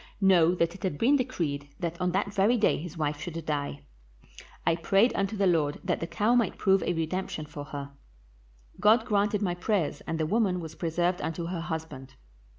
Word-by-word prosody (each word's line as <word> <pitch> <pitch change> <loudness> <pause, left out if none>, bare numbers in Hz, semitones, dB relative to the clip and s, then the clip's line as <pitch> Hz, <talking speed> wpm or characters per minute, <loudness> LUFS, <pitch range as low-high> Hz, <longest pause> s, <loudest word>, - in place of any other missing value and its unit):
Know 180 -3 +5
that 170 -1 +1
it 190 - -12
had 185 -7 -2
been 265 - +4
decreed 165 - -2
that 170 -1 -4
on 180 0 +1
that 200 +2 -1
very 205 +5 +3
day 215 - +3
his 170 +1 -8
wife 150 -1 -2
should 165 -2 -5
die. 145 -2 -3 0.8
I 165 - +3
prayed 195 +8 +3
unto 200 +2 -1
the 200 - +2
Lord 155 -5 +2
that 180 -1 0
the 165 - -3
cow 205 +7 +1
might 235 -5 +2
prove 195 -2 +3
a - - 0
redemption 165 -1 -3
for 150 -1 -8
her; 140 -1 -7 0.9
God 220 +2 +5
granted 210 -2 +1
my 180 -3 0
prayers, 180 -2 -1
and 165 0 -2
the 155 - +1
woman 195 0 +1
was 160 -2 -7
preserved 175 +2 -1
unto 165 +1 -3
her 175 -2 -3
husband. 160 -6 -6
175 Hz, 195 wpm, -28 LUFS, 160-200 Hz, 0.9 s, Know